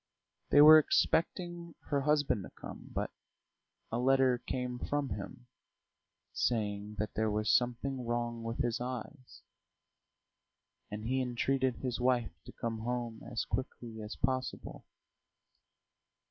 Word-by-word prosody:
They 145 - +7
were 155 +1 +11
expecting 170 +2 0
her 140 -1 +1
husband 145 -6 +2
to - - -8
come, - - -10
but - - -2 0.8
a 115 - 0
letter 130 -1 +4
came 125 0 -3
from 145 0 -1
him, 120 +5 -6 0.9
saying 105 -2 -1
that 105 0 -2
there 110 0 +1
was 105 +1 +1
something 125 +2 0
wrong 120 0 -2
with 115 0 -4
his 120 -1 -1
eyes, 125 +2 -7 1.5
and 105 +1 -6
he 130 +3 +1
entreated 130 +1 0
his 125 -2 -3
wife 125 -5 +2
to - - -9
come 115 -1 -4
home 120 -1 -3
as 120 - -1
quickly 120 -4 -5
as 105 0 -6
possible. 130 -2 -3
125 Hz, 125 wpm, -32 LUFS, 115-135 Hz, 1.5 s, were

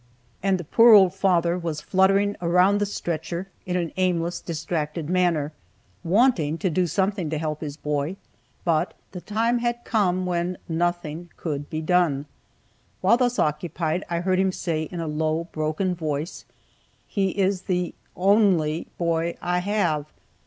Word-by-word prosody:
And 195 0 +2
the 175 - -6
poor 230 +7 +7
old 190 -3 +6
father 180 -2 +2
was 165 -3 -3
fluttering 195 +4 +2
around 180 +4 +4
the 205 - 0
stretcher, 175 0 -4 0.2
in 180 - -1
an 170 -3 -1
aimless, 175 -2 0
distracted 160 -1 -3
manner, 170 -5 +1 0.5
wanting 175 - +3
to 185 0 -1
do 180 +2 +1
something 190 -2 0
to 155 - -2
help 155 -1 -3
his 150 -2 -5
boy 150 +3 -2 0.5
but 165 -3 +1 0.2
the 180 - -7
time 230 +4 0
had 240 0 -2
come 185 -4 +1
when 175 0 -1
nothing 175 0 -2
could 145 -3 -4
be 155 - -3
done. 155 -5 +2 0.8
While 200 +6 +5
thus 245 -1 +1
occupied 160 +3 -1
I 170 0 -1
heard 185 +1 +1
him 190 0 +2
say 160 -4 -2
in 175 - -5
a 165 - -3
low, 155 +1 0
broken 155 +4 -1
voice, 155 -1 -4 0.6
"He 195 -2 0
is 190 -1 +1
the 180 -2 -1 0.2
only 185 -5 +3
boy 170 0 0
I 180 0 0
have." 175 -6 0
175 Hz, 150 wpm, -24 LUFS, 160-190 Hz, 0.8 s, poor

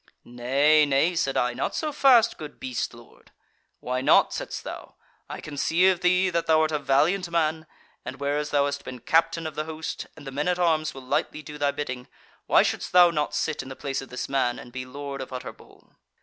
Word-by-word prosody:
'Nay, 135 +6 +3
nay,' 145 +5 +2
said 135 -5 0
I, 125 0 +1
'not 125 - -3
so 310 -1 -2
fast, 255 -5 +4
good 150 -2 -9
beast 125 -2 -3
lord.' 120 0 -18 0.5
'Why 125 +1 -2
not?' - - +4
saidst - - -5
thou, - - -9 0.3
'I - - -6
can 145 -2 -8
see 170 +6 +3
of 185 -2 +1
thee 180 +1 +3
that 170 -1 -1
thou 160 -1 +4
art 155 0 +1
a 150 - 0
valiant 155 +7 +2
man, 160 -1 0 0.4
and - - -6
whereas 145 +1 -1
thou 145 -1 +2
hast 140 0 -3
been 130 0 -7
captain 165 +5 +1
of 155 - -4
the 155 +1 -3
host, 160 0 -6
and 150 - -12
the 135 - -6
men 145 +4 -2
at 180 -1 +1
arms 160 -4 +1
will 135 -1 -10
lightly 150 +2 -2
do 150 +1 -9
thy 145 0 +2
bidding, 130 -3 -5 0.4
why - - +5
shouldest - - -3
thou 175 -1 +7
not 150 -2 -2
sit 155 - -1
in 135 - -10
the 135 - -7
place 135 0 -3
of 135 - -11
this 125 - -5
man, 130 -3 0
and 120 - -11
be 125 +1 -6
Lord 140 +1 -6
of 130 - -8
Utterbol?' 125 -1 -10
150 Hz, 220 wpm, -25 LUFS, 135-160 Hz, 0.5 s, thou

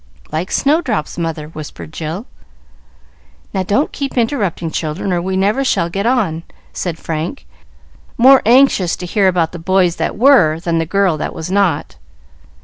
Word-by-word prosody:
"Like 170 +5 -2
Snowdrop's 275 - 0
mother," 160 -2 -3
whispered 155 0 -9
Jill. 165 +8 -5 1.3
"Now, 190 - 0
don't 205 - 0
keep 275 -2 -5
interrupting, 205 - -1
children, 165 +5 -2
or 175 - 0
we 190 +1 -2
never 205 +8 +1
shall 170 -9 0
get 200 +5 -1
on," 205 -11 +1 0.3
said 175 -3 -3
Frank, 165 - -5 0.7
more 265 +3 +7
anxious 235 -7 +4
to 180 - -7
hear 195 +2 +2
about 175 -3 +1
the 175 - -8
boys 180 0 +1
that - - -2
were 215 - +5
than 165 -1 -1
the 165 - -2
girl 195 -3 +1
that - - -4
was 165 +3 -5
not. 165 - 0
185 Hz, 155 wpm, -16 LUFS, 165-215 Hz, 1.3 s, more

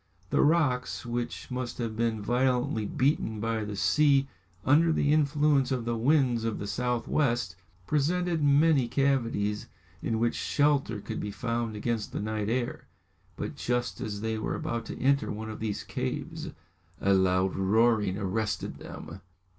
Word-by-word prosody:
The - - +3
rocks, 145 -7 +2
which 120 +2 -4
must 125 -1 -3
have 115 -3 -3
been 110 -2 -1
violently 125 -2 +1
beaten 130 -6 0
by 110 0 -1
the 105 0 -5
sea 140 +4 +3 0.4
under 160 +4 +5
the 145 -2 +2
influence 145 -2 +3
of 125 -3 -1
the 120 0 0
winds 125 -1 +2
of 115 -1 -1
the 100 - -5
south 120 +4 -1
west, 120 - +1 0.3
presented 165 - +1
many 145 -2 +4
cavities 115 -6 0 0.3
in 115 - -1
which 115 +1 +1
shelter 140 -7 +1
could - - -5
be 105 - -3
found 115 +1 -2
against 110 0 -2
the - - -2
night 110 0 -2
air. 120 +1 -2 0.5
But - - -5
just 120 0 -2
as 105 -1 -4
they 110 0 -2
were - - -2
about 115 0 -3
to - - -6
enter 140 +2 +2
one 110 +1 -5
of 110 - -8
these 110 -2 -3
caves 65 - -4 0.5
a 100 - +3
loud 95 0 +2
roaring 105 0 +2
arrested 105 +2 -2
them. 90 +4 -9
120 Hz, 155 wpm, -28 LUFS, 110-140 Hz, 0.5 s, under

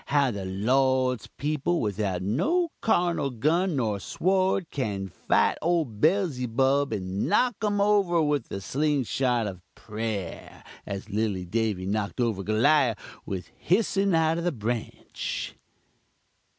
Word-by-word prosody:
how 140 -3 +3
the 100 -3 -5
Lord's 130 +5 +1
peepul 155 +4 0
without 100 -4 -1
no 320 - +1
carnul 165 - +1
gun 170 - +2
nor 110 -6 0
sword, 185 - +1
can 100 -8 -2
fite 90 - +1
ole 170 -1 +2
Bellzybub 135 - +1
and 95 -2 -2
knock 235 +2 +2
um 205 -1 +1
over 200 -4 +3
with 145 -5 +1
the 100 - -5
sling 145 +4 0 0.2
rock 120 -3 +2
of 95 -3 -6
prayer, 105 -5 -5 0.2
as 100 +2 -6
lilly 100 -3 -1
Davy 105 -1 -1
knocked 100 +3 -2
over 115 -5 0
Goliawh 115 +4 +3 0.3
with 95 -3 -5
hissin 195 0 +2
out 160 0 +2
of - - -4
the 175 - +1
Branch. 115 -3 -4
130 Hz, 130 wpm, -26 LUFS, 105-165 Hz, 0.3 s, how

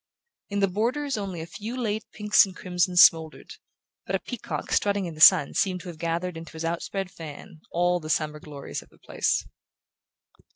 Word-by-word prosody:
In 200 0 -1
the 195 - +4
borders 250 +9 -1
only 195 -5 -4
a - - -5
few 220 +8 -7
late 215 -3 -2
pinks 210 0 +4
and 190 -2 -6
crimsons 180 -1 +4
smouldered, 160 -1 +2 0.5
but - - 0
a - - 0
peacock 245 -4 -6
strutting 200 -1 +1
in 170 - -5
the 155 - -10
sun 145 - +7
seemed 185 -2 0
to 180 - -8
have 165 -2 -10
gathered 170 +1 -2
into 165 0 -10
his 160 0 -5
out 165 +1 -2
spread 195 -2 -4
fan 165 0 -10
all 175 +1 +1
the 155 -2 -9
summer 150 -1 -1
glories 145 -2 -7
of - - -19
the - - -24
place. - - -1
180 Hz, 195 wpm, -26 LUFS, 165-200 Hz, 0.5 s, sun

